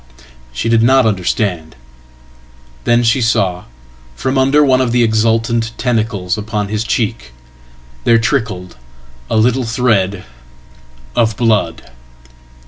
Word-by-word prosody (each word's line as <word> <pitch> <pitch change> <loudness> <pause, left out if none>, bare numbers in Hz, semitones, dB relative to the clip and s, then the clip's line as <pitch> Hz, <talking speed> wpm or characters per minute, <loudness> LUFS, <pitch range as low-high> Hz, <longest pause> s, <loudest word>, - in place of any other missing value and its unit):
She 65 - -4
did 115 -1 +3
not 130 +2 +4
understand. 90 -4 -1 1.1
Then 120 0 +3
she 115 +3 +2
saw 95 -6 0 0.5
from 130 - -2
under 135 +3 +3
one 130 -1 +3
of 125 -2 0
the 120 0 +3
exultanttentacles 115 -2 0
upon 105 -1 -3
his 110 +1 -2
cheek 80 - -2 0.7
there 115 - +4
trickled 110 - -2 0.5
a - - 0
little 125 +4 +2
thread 110 -5 0 0.9
of 110 -3 +1
blood. 110 - 0
115 Hz, 110 wpm, -15 LUFS, 105-120 Hz, 1.1 s, not